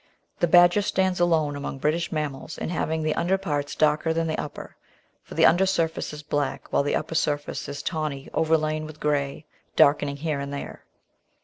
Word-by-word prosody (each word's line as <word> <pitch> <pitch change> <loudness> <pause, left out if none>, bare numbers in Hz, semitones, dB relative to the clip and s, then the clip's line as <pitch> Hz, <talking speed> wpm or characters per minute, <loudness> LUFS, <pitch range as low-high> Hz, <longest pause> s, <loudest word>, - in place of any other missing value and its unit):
The 175 - +3
Badger 175 +4 +6
stands 190 -2 0
alone 160 -4 +2
among 140 -1 -5
British 155 +5 0
mammals 150 -1 -4
in - - -4
having 160 -2 -1
the 155 0 +1
under 185 +3 +1
parts 145 -7 -3
darker 155 +1 +2
than 165 0 +1
the 155 -1 -1
upper, 150 - -7 0.5
for - - -12
the - - +5
under 185 +4 +5
surface 165 -4 0
is 150 0 -8
black 145 -2 -3
while - - +4
the 145 - 0
upper 155 - -3
surface 145 -3 -1
is 140 - -6
tawny, 155 -5 -3
overlain 155 -1 +1
with 155 -1 -11
grey, 145 0 -1 0.3
darkening 140 0 +4
here 150 -1 -2
and 140 0 -5
there. 140 - -7
155 Hz, 185 wpm, -25 LUFS, 145-165 Hz, 0.5 s, Badger